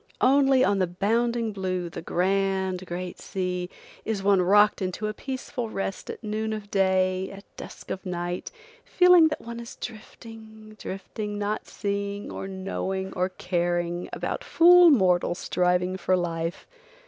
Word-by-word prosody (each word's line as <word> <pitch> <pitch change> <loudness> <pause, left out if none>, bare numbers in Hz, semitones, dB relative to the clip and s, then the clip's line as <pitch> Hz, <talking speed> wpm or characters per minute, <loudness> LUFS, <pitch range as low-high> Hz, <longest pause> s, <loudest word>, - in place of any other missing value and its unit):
Only 270 0 +5
on 200 -5 +2
the 185 - +2
bounding 230 +5 0
blue, 185 -3 -3
the 165 - -7
grand, 190 +1 0
great 180 +1 -5
sea, 180 -1 -3 0.3
is 210 -3 -3
one 195 -2 +4
rocked 205 +3 +4
into 185 +3 -3
a 215 - -2
peaceful 260 -1 -5
rest 195 -2 -4
at - - -7
noon 220 +1 -2
of 210 -1 -7
day, 190 -1 +1
at 200 0 -11
dusk - - -10
of 190 - -4
night, 175 -1 -4 0.3
feeling 360 -3 +6
that 305 - -4
one 235 0 -7
is 235 0 -9
drifting, 220 -1 -11
drifting, 205 +2 -5
not 205 +1 -2
seeing, 200 0 -3
or 195 - -5
knowing, 190 0 -4
or 185 +1 0
caring, 175 -1 -2
about - - -3
fool 355 -2 +7
mortals 180 - +3
striving 180 +1 0
for 185 0 +1
life. 165 0 -3
195 Hz, 150 wpm, -26 LUFS, 185-220 Hz, 0.3 s, fool